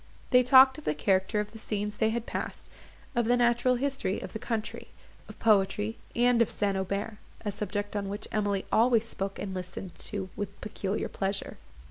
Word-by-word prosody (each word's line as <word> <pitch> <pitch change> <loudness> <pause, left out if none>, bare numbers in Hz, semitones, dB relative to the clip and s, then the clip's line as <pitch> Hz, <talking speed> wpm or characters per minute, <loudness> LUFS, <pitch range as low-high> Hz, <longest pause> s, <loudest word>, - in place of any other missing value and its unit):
They 250 - +7
talked 260 +2 +7
of - - -13
the 150 - 0
character 190 +6 +1
of 210 0 -3
the 225 - -10
scenes 210 -1 -2
they 220 - +3
had 230 +1 -2
passed, - - -5 0.4
of 240 -1 +2
the 245 +2 +3
natural 240 +1 +3
history 270 -6 -1
of - - -8
the 220 - -4
country, 220 -2 -4 0.4
of - - -10
poetry, 210 +1 +2 0.2
and 245 0 +4
of 230 - +3
St. 200 -1 0
Aubert; 200 +3 -3 0.3
a 205 - 0
subject 205 +1 -3
on 200 -1 -2
which 205 +2 -5
Emily 205 -2 0
always 230 0 +4
spoke 195 -3 -4
and 195 -2 -4
listened 180 0 -6
to 195 -3 -4
with 200 -1 -5
peculiar 210 -1 -3
pleasure. 195 0 -3
210 Hz, 185 wpm, -29 LUFS, 195-235 Hz, 0.4 s, They